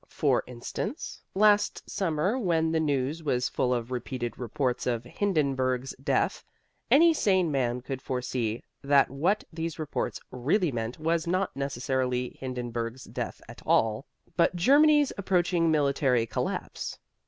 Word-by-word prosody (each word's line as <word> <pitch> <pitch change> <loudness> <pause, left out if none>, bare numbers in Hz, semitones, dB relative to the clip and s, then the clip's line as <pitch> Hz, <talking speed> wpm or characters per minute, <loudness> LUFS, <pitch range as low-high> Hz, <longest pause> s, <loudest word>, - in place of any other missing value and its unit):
For - - +1
instance, 125 - -5
last 205 +1 +3
summer 180 +3 0
when 165 -6 +1
the 160 - +2
news 145 0 0
was 125 -5 0
full 125 - 0
of 120 0 -1
repeated 125 -1 -3
reports 125 +1 -1
of 120 -2 0
Hindenburg's 135 - 0
death, - - +1 0.5
any 330 +3 +6
sane 185 - +2
man 125 -3 0
could 130 +1 -5
foresee 125 -3 -2 0.2
that 140 -2 +4
what 175 +10 +1
these 165 -1 -4
reports 155 -3 -3
really 150 - +1
meant 115 0 -3
was 165 +1 0
not 185 -1 0
necessarily 130 -2 -1
Hindenburg's 120 -1 -4
death - - -5
at - - -11
all, 110 +4 +2 0.3
but 175 +1 +3
Germany's 290 - +5
approaching 175 -3 +2
military 140 -5 +2
collapse. - - -4
140 Hz, 130 wpm, -28 LUFS, 125-170 Hz, 0.5 s, any